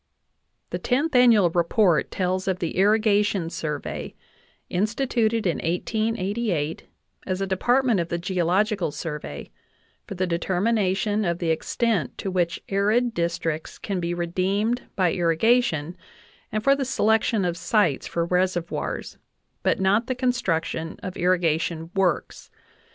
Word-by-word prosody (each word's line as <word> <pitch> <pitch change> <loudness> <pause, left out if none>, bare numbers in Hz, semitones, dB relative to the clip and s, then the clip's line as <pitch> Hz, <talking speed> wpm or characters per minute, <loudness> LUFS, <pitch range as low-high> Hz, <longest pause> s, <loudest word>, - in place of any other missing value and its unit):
The - - -2
Tenth 285 +4 0
Annual 230 -8 +6
Report 175 0 +2
tells 185 0 -1
of 190 -1 +1
the 175 -3 -3
Irrigation 205 -3 +2
Survey, 150 -3 -4 0.5
in 185 +4 +1
stituted 230 -2 0
in 175 - +1
1888, 195 -2 -1 0.4
as 185 0 -1
a 195 - 0
department 240 +4 +2
of 170 0 -2
the 170 - -1
Geological 185 +3 0
Survey, 150 0 -6 0.6
for 200 - -6
the 185 +1 0
determination 195 +3 0
of 170 -3 0
the 170 -2 0
extent 175 - -1
to 195 - -3
which 175 -2 0
arid 215 +5 +1
districts 170 -3 -2
can 195 -3 -3
be 175 0 -2
redeemed 195 +7 0
by 180 -3 +2
irrigation 175 -2 +2 0.6
and 215 0 -2
for 275 +3 +5
the 280 - -2
selection 220 -4 +2
of 175 -1 -1
sites 175 - +1
for 170 -1 -1
reservoirs, 180 -1 -2 0.4
but - - +1
not 205 +5 +2
the 255 - -1
construction 170 -10 -1
of 185 -2 -5
irrigation 165 -2 0
works. 190 -5 -1
185 Hz, 130 wpm, -24 LUFS, 170-220 Hz, 0.6 s, Annual